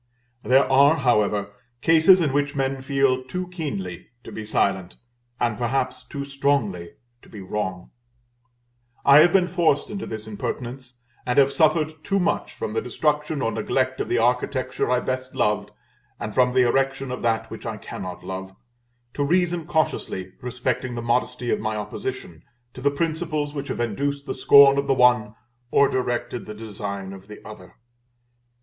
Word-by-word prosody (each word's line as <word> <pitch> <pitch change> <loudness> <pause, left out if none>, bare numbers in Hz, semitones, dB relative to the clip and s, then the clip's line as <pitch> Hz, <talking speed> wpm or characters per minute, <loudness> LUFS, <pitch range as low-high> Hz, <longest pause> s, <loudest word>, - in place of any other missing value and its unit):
There 130 +2 +4
are, 140 +3 +5
however, 105 -7 +1 0.3
cases 165 +3 +6
in 145 -5 0
which 145 0 0
men 135 -1 -1
feel 135 -1 +1
too 180 +8 -5
keenly 100 - -5 0.2
to - - -10
be 110 - -6
silent, 95 -3 -1 0.4
and 115 -2 0
perhaps 125 +1 -1
too 140 +2 -6
strongly 135 -11 -1 0.3
to - - -19
be 105 - -10
wrong; 95 -2 -4 1.1
I 140 +1 +8
have 170 +3 +6
been 185 -2 +3
forced 170 -5 +1
into 200 -1 -5
this 110 -1 -6
impertinence; 120 +4 -6 0.3
and 125 - -2
have 140 0 +5
suffered 155 -1 +1
too 195 +5 0
much 175 - -1
from 105 - -4
the 115 - 0
destruction 150 +3 -1
or 115 - 0
neglect 130 +4 -1
of - - -4
the 120 - +1
architecture 125 +2 0
I 125 0 +2
best 130 0 -4
loved, 105 0 0 0.5
and 105 - -5
from 125 +1 +2
the 130 - +5
erection 135 +1 0
of 125 - -5
that 115 -1 -1
which - - -7
I - - -4
cannot 90 -1 -8
love, 95 0 -7 0.6
to 145 - -1
reason 175 +1 +1
cautiously 95 - -1
respecting 125 0 -3
the 120 - -4
modesty 125 +1 0
of - - +1
my 110 0 -2
opposition 85 -5 -6 0.3
to 130 - -10
the 140 - +3
principles 155 -1 -2
which 140 -2 -5
have - - -4
induced 140 +5 -2
the - - -3
scorn 140 0 +7
of 140 - -2
the 135 - +3
one, 125 -4 +3 0.3
or 140 - +4
directed 120 -2 -2
the 105 - -7
design 100 -3 -6
of 95 0 -12
the 105 - -12
other. 100 -4 -12
130 Hz, 170 wpm, -23 LUFS, 110-140 Hz, 1.1 s, I